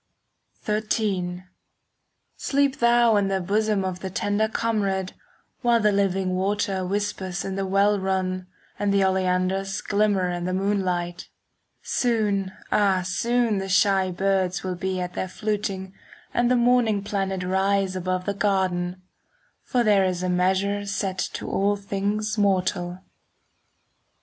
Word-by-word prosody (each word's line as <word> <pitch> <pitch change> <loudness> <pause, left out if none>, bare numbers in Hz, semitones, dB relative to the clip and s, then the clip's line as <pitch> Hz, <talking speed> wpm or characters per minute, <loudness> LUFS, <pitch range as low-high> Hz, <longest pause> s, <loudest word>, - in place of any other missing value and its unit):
XIII 205 -4 -1 0.9
Sleep 280 -1 0
thou 235 -2 +4
in 200 -1 +2
the 195 0 0
bosom 205 +1 0
Of 185 -1 -3
the 190 - -5
tender 205 +3 0
comrade, 200 -5 -1 0.5
While 240 -2 +3
the 210 -1 +3
living 195 -2 +1
water 195 0 0
Whispers 190 -2 -2
in 195 - -3
the 195 0 -2
well 200 +2 +3
run, 185 -1 -1 0.3
And 205 -1 +1
the 200 -1 +3
oleanders 190 +1 0
5 - - -17
Glimmer 200 -3 +2
in 175 0 -3
the 185 - -1
moonlight. 185 -3 -1 0.5
Soon, 210 -6 0 0.2
ah, 195 -3 +3
soon 235 +2 +1
the 195 0 -4
shy 190 0 +3
birds 185 -1 0
Will 185 -1 -2
be 185 +1 -3
at 180 0 -4
their 185 - -3
fluting, 200 -2 -3 0.4
And 240 0 +2
the 250 - +4
morning 240 -4 +3
planet 195 -2 -2
Rise 190 +1 +1
above 185 0 -2
the 200 - -1
garden; 190 -3 0
10 185 - -27 0.6
For 245 -2 +1
there 205 -3 +4
is 185 -1 -1
a 185 - 0
measure 190 +3 +1
Set 195 -1 -2
to - - -5
all 200 +1 +1
things 205 +2 -2
mortal. 185 -2 0
195 Hz, 140 wpm, -24 LUFS, 185-205 Hz, 0.9 s, thou